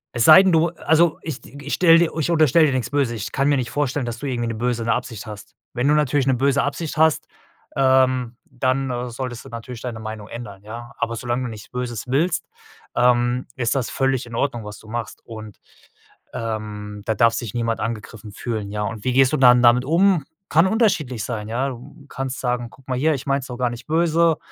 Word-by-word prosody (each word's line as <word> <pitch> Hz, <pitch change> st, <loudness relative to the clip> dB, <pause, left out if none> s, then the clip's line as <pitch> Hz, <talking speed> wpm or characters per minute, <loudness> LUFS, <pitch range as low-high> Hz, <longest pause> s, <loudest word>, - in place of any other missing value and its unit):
es 115 Hz, -2 st, +2 dB
sei 160 Hz, +5 st, +9 dB
denn 190 Hz, -, +3 dB
du 165 Hz, 0 st, +3 dB
also, 160 Hz, 0 st, +2 dB
ich 150 Hz, -5 st, -5 dB
d 140 Hz, -, -14 dB
ich 145 Hz, -, -3 dB
stelle 165 Hz, -2 st, +6 dB
dir 170 Hz, -1 st, +2 dB
ich 155 Hz, -, 0 dB
unterstelle 155 Hz, -1 st, +4 dB
dir 135 Hz, -, 0 dB
nix 125 Hz, -2 st, -2 dB
Böses. 140 Hz, -4 st, +1 dB
Ich 110 Hz, +1 st, -5 dB
kann 140 Hz, +2 st, +1 dB
mir 145 Hz, -, +3 dB
nicht 125 Hz, -2 st, -3 dB
vorstellen, 145 Hz, -2 st, -1 dB
dass 120 Hz, -1 st, -5 dB
du 145 Hz, -, -4 dB
irgendwie 120 Hz, -3 st, -2 dB
'ne 115 Hz, -, -2 dB
böse 115 Hz, 0 st, -2 dB
Absicht 115 Hz, -3 st, -3 dB
hast. 105 Hz, -2 st, -10 dB, 0.2 s
Wenn 125 Hz, +3 st, 0 dB
du 150 Hz, -, +4 dB
natürlich 145 Hz, -2 st, +1 dB
'ne 130 Hz, -, +3 dB
böse 140 Hz, +2 st, +2 dB
Absicht 145 Hz, +3 st, -3 dB
hast, 160 Hz, -1 st, +3 dB, 0.5 s
ähm, 130 Hz, -2 st, +2 dB
dann 130 Hz, -1 st, -2 dB
solltest 120 Hz, 0 st, -6 dB
du 135 Hz, -, -12 dB
natürlich 115 Hz, 0 st, -8 dB
deine 120 Hz, -3 st, -5 dB
Meinung 110 Hz, -1 st, -7 dB
ändern, 105 Hz, -5 st, -9 dB
ja. 115 Hz, +3 st, -9 dB
Aber 115 Hz, -, -1 dB
solange 120 Hz, +2 st, -2 dB
du 120 Hz, -, -4 dB
nichts 105 Hz, -2 st, -10 dB
Böses 125 Hz, -3 st, -4 dB
willst, 155 Hz, +7 st, +1 dB, 0.5 s
ähm, 120 Hz, 0 st, +2 dB
ist 120 Hz, -4 st, 0 dB
das 130 Hz, -4 st, -1 dB
völlig 135 Hz, -2 st, 0 dB
in 115 Hz, -, -8 dB
Ordnung, 120 Hz, -3 st, -1 dB
was 105 Hz, 0 st, -8 dB
du 110 Hz, -, -16 dB
machst. 115 Hz, +1 st, -5 dB
Und, 110 Hz, -2 st, -10 dB, 0.7 s
ähm, 105 Hz, -2 st, -5 dB
da 110 Hz, -, 0 dB
darf 115 Hz, +2 st, +4 dB
sich 115 Hz, -3 st, -4 dB
niemand 115 Hz, -1 st, -1 dB
angegriffen 110 Hz, -1 st, -5 dB
fühlen, 110 Hz, -2 st, -4 dB
ja. 105 Hz, 0 st, -2 dB
Und 110 Hz, 0 st, -5 dB
wie 130 Hz, -, +1 dB
gehst 135 Hz, +1 st, +4 dB
du -, -, +3 dB
dann 125 Hz, -1 st, +6 dB
damit 120 Hz, +1 st, +5 dB
um? 170 Hz, 0 st, +3 dB, 0.2 s
Kann 165 Hz, +4 st, +4 dB
unterschiedlich 190 Hz, -, +1 dB
sein, 110 Hz, -3 st, -4 dB
ja. 125 Hz, +5 st, -1 dB
Du 135 Hz, +3 st, -11 dB
kannst 135 Hz, -1 st, -4 dB
sagen: 125 Hz, -2 st, -2 dB
„Guck 135 Hz, +2 st, -20 dB
mal 130 Hz, -1 st, -1 dB
hier, 155 Hz, +3 st, +2 dB
ich 130 Hz, -, -7 dB
meine 140 Hz, 0 st, +1 dB
es 130 Hz, -, -9 dB
doch 125 Hz, -, -7 dB
gar 125 Hz, -1 st, 0 dB
nicht 120 Hz, -, -9 dB
böse.“ 165 Hz, 0 st, +3 dB
125 Hz, 225 wpm, -22 LUFS, 115-140 Hz, 0.7 s, sei